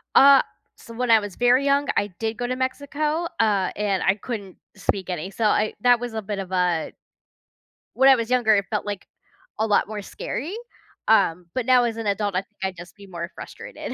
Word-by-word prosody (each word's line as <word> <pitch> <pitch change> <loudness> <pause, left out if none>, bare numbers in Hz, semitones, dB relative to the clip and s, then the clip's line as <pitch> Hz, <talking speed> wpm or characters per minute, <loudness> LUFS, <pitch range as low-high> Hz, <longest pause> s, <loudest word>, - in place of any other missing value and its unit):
Ah, 275 0 +8 0.3
so 230 - -13
when 245 0 0
I 225 - +7
was 205 -3 -7
very 245 +3 +3
young, 280 0 +2
I 205 - +2
did 225 0 -2
go 245 0 -2
to 255 - -2
Mexico, 295 +5 -2
uh, 205 -4 +2
and 200 -2 0
I 190 - +3
couldn't 205 -4 -7 0.2
speak 195 -1 -2
any. 180 +1 -3
So 225 - -4
I 215 0 +2
that 245 -1 +5
was 240 -2 -5
a 220 - -3
bit 200 0 -4
of 190 -1 -6
a 180 -3 0 1.0
When 265 +2 +5
I 265 - +8
was 230 -1 -3
younger, 240 -4 +4
it 200 -1 +1
felt, 210 -1 -2
like, 205 -2 -5 0.5
a 220 - +2
lot 205 - +2
more 210 -1 -5
scary. 310 - -5 0.5
Um, 175 +2 +3
but 255 -2 -1
now 250 -2 +5
as 230 -1 -2
an 225 - -4
adult, 200 -1 -1
I 185 - +2
think - - -30
I'd 190 -1 -2
just 175 +1 -12
be 200 -1 -14
more 170 -1 -6
frustrated. - - -8
215 Hz, 215 wpm, -23 LUFS, 195-250 Hz, 1.0 s, Ah